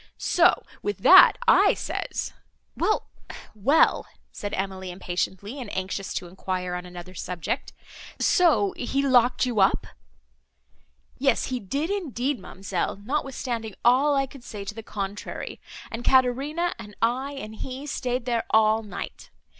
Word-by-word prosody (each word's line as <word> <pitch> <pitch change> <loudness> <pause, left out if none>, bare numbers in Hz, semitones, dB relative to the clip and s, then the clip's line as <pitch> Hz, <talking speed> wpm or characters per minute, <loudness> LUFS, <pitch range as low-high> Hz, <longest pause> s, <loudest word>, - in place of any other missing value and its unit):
So, 355 +1 +3 0.2
with 410 - -3
that - - +9
I - - +6
says—" - - -4 0.4
"Well, 430 - 0 0.4
well," 240 +10 +3 0.2
said 205 - -5
Emily, 190 -1 -4
impatiently, 190 +6 -4
and 230 - -7
anxious 190 +1 -3
to 180 - -3
enquire 180 0 -4
on 180 0 -5
another 180 +1 -10
subject,—"so 200 - 0
he 275 +3 -1
locked 250 -1 +4
you 240 -4 -1
up?" 190 - +3 1.3
"Yes, 270 -2 +2
he 250 - -1
did 280 - -2
indeed, 285 - -2
ma'amselle, 190 0 -3
notwithstanding 245 -5 -3
all 270 +4 +5
I 275 0 +2
could 270 -1 -14
say 205 -4 -7
to 200 - -5
the 225 - -7
contrary; 200 -2 -6 0.3
and 230 +1 -5
Caterina 270 +8 +2
and 210 -2 -10
I 255 +5 0
and 220 -6 -7
he 260 +4 -6
staid 250 -3 -2
there 235 -2 0
all 220 0 +4
night. 210 -2 -8
230 Hz, 135 wpm, -25 LUFS, 195-270 Hz, 1.3 s, that